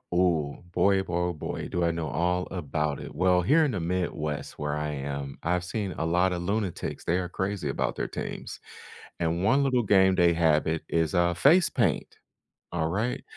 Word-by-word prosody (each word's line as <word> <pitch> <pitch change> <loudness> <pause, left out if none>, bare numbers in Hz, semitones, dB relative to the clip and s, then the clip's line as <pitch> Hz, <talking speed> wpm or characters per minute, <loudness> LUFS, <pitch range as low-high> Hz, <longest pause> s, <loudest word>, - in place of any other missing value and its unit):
Ooh, 85 -5 +1
boy, 95 +1 +3
oh, - - -1
boy, 90 - -7
oh, 90 0 0
boy, 75 - -5
do 90 - -1
I 85 - +2
know 85 -1 -3
all 90 +5 0
about 75 -4 -2
it. - - -8
Well, 90 +3 +3
here 155 - +4
in 140 - 0
the 90 - -2
Midwest 85 -4 -3
where 75 0 -2
I 75 0 -2
am, 70 -1 -5
I've 90 +1 0
seen 100 -1 -3
a 80 - -1
lotta 90 +2 +2
lunatics; 100 +1 -3
they 85 - +1
are 90 - -2
crazy 95 -2 -3
about 65 -2 -2
their - - -2
teams, - - -6 0.6
and 85 +1 0
1 135 +7 +4
little 125 -3 +2
game 95 -2 +4
they 85 -2 +4
have 80 -2 +3
it 80 0 -1
is, 80 +1 +1
uh, 85 0 +3
face 160 - +5
paint, - - 0 0.6
alright? 85 +9 -1
85 Hz, 195 wpm, -27 LUFS, 80-95 Hz, 0.6 s, face